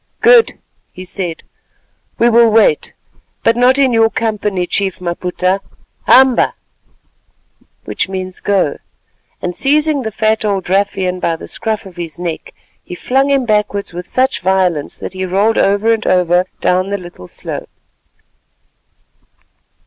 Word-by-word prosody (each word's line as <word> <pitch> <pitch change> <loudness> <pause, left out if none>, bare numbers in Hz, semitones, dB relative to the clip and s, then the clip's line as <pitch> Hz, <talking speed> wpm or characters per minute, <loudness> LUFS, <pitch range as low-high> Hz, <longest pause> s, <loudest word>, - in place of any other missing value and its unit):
"Good," 475 -2 +5 0.3
he 185 - -10
said, 175 -2 -3 0.7
"we 235 - +3
will 235 0 +5
wait, 215 -8 +2 0.5
but 230 - +3
not 250 +2 +4
in 270 -3 +3
your 225 -1 +4
company, 210 -5 -2
Chief 190 +1 -2
Maputa. 180 +2 -1 0.5
Hamba! 260 -1 +5 1.3
(go)——" 185 -3 -1 0.7
and 180 -1 -3
seizing 300 +1 +1
the 220 -3 -4
fat 220 +1 0
old 200 -3 -1
ruffian 190 -2 0
by 170 -2 0
the - - -10
scruff 220 -1 -3
of 185 -2 -13
his 165 -4 -6
neck, 170 -2 -5 0.3
he 180 - -8
flung 270 +8 0
him 275 -2 +2
backwards 210 -3 -1
with 180 +1 -7
such 260 +1 0
violence 180 -5 0
that - - -7
he 185 0 -4
rolled 200 +5 +1
over 205 +3 +2
and 220 -1 -3
over 180 0 +2
down 185 +1 +1
the 200 - -1
little 175 - -11
slope. - - -7
195 Hz, 135 wpm, -15 LUFS, 180-225 Hz, 1.3 s, Good